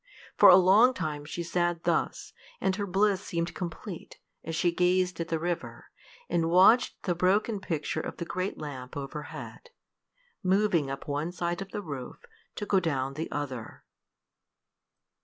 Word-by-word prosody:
For - - +8
a 180 - +10
long 200 +8 +6
time 150 -4 -4
she 170 +3 -4
sat 175 0 -1
thus, - - -1 0.3
and 190 - +1
her 205 0 -3
bliss 195 +1 +2
seemed 170 -2 -3
complete, 175 0 -7 0.3
as 165 0 -4
she 175 +2 +2
gazed 180 0 +1
at 165 - -2
the 165 - -1
river, 170 +1 -4 0.4
and 165 -1 +1
watched 190 +8 +5
the 180 - +1
broken 195 +5 +1
picture 160 -4 -3
of - - -6
the 170 - -4
great 185 +3 -3
lamp 130 -3 -7
overhead, 150 - -7 0.7
moving 185 -6 +2
up 135 0 -6
one 145 +4 -2
side 175 +1 -3
of 195 - -6
the 205 - -5
roof 140 - -7 0.3
to 205 - -4
go 195 -1 +3
down 135 -6 -1
the 160 +4 -4
other. 130 -6 -5
175 Hz, 160 wpm, -28 LUFS, 155-190 Hz, 0.7 s, a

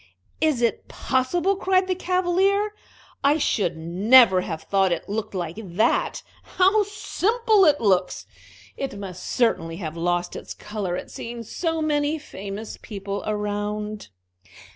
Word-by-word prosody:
"Is 305 -6 +2
it 230 - 0
possible?" 335 +9 0
cried 375 -1 +2
the 375 - 0
Cavalier. 370 +3 +1 0.5
"I 285 +2 +4
should 200 - 0
never 190 +5 +5
have 160 -3 -5
thought 195 -2 +2
it 170 - -2
looked 210 0 -4
like 175 0 -4
that! 190 +3 0 0.3
How 385 +4 +5
simple 430 +1 +2
it 295 -2 +4
looks! 185 - +1 0.5
It 270 -7 -4
must 185 -3 -7
certainly 165 -9 0
have 160 -4 -5
lost 175 +1 -1
its - - -7
color 200 -4 -4
at - - -8
seeing 235 0 -6
so 325 - -2
many 295 0 +1
famous 205 -6 -8
people 200 -2 -5
around." 210 0 -3
220 Hz, 135 wpm, -24 LUFS, -, 0.5 s, never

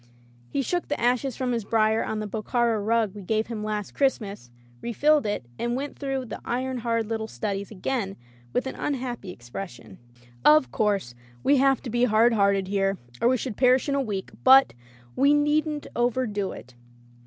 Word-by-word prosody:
He 275 - -1
shook 350 +7 -1
the 290 - -2
ashes 245 +1 +1
from 255 -1 -1
his 230 -2 -1
brier 220 +1 +2
on 220 - -3
the 215 - -3
Bokhara 225 +1 0
rug 220 -2 +1
we 205 - -9
gave 215 +3 0
him 225 -3 -5
last 210 -1 -3
Christmas, 205 - -1 0.3
refilled 290 +3 +2
it, 205 -12 -2
and 240 0 -1
went 280 +2 -5
through 270 -2 -2
the - - -7
iron 255 +1 -2
hard 230 -1 0
little 220 0 -3
studies 200 -2 -4
again 205 0 -3 0.4
with 250 - 0
an 265 - -4
unhappy 245 -8 -4
ex 120 -7 -15
pression. 120 - -8 0.4
"Of 150 -5 +5
course 200 - 0 0.3
we 285 - +4
have 270 0 +3
to 240 - -5
be 240 +1 +3
hard 230 +1 +4
hearted 200 -2 +2
here, 195 0 0 0.2
or - - +4
we 255 +1 +3
should 240 -3 -5
perish 255 +1 +4
in 280 - 0
a 280 - +1
week, 205 -6 -4
but 265 +1 +7 0.2
— 120 0 -26
^we 280 +2 +4
needn't 295 0 +1
overdo 240 -5 0
it." 125 +3 -11
230 Hz, 190 wpm, -26 LUFS, 200-260 Hz, 0.4 s, but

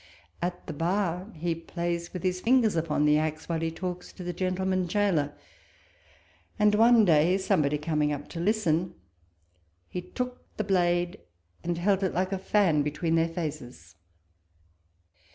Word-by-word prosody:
At 175 +1 -3
the - - -5
bar, 180 +4 -1
he 165 +2 -1
plays 170 +1 -4
with 180 - -6
his 185 -1 0
fingers 230 -3 +3
upon 155 -2 +1
the 150 0 +4
axe, 155 0 -3
while 165 -1 -1
he 165 0 -1
talks 180 +2 -5
to 180 - -9
the 175 0 -3
gentleman 185 0 -1
gaoler; 170 -7 +1 1.3
and 210 -1 +4
one 225 +1 +6
day 170 +2 +4
somebody 155 -7 +1
commg 150 -1 0
up 145 -1 -4
to 165 - -6
listen, 180 -3 +1 0.9
he 180 - -4
took 250 +7 -5
the 215 - 0
blade 175 -3 +1 0.4
and 170 0 -1
held 195 +2 +2
it 190 - -1
like 185 +2 0
a 195 - -1
fan 185 -6 +2
between 150 +3 -1
their 165 0 +3
faces. 145 - -6
175 Hz, 155 wpm, -28 LUFS, 160-190 Hz, 1.3 s, one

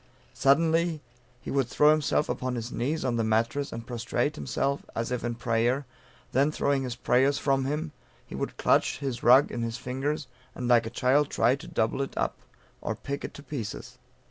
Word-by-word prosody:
Suddenly, 165 +3 +3 0.4
he - - -6
would 135 -3 +1
throw 150 +4 +5
himself 150 -1 +2
upon 130 -1 -2
his 120 +1 -4
knees 145 +5 -1
on 120 -2 0
the 115 - +1
mattress, 115 +6 0
and 115 0 -6
prostrate 120 +4 -1
himself 140 -2 -1
as 115 +1 -2
if 125 - -2
in 120 0 -2
prayer; 120 +3 0 0.5
then 140 +4 +3
throwing 140 -2 +1
his 125 -3 -3
prayers 130 +3 +2
from 135 -2 +1
him, 150 +3 -2 0.3
he - - -12
would - - -4
clutch - - +2
his 135 -4 -4
rug 130 +4 +6
in 120 - -3
his 115 0 -2
fingers, 135 +5 -3 0.3
and 125 - -3
like 120 -2 +4
a - - -3
child 135 +4 +2
try 125 - +3
to 155 +5 -11
double 110 +4 0
it 135 - -5
up, - - -1 0.4
or - - -2
pick 140 0 -5
it - - -6
to 145 - -10
pieces. 110 - -6
130 Hz, 195 wpm, -28 LUFS, 120-145 Hz, 0.5 s, rug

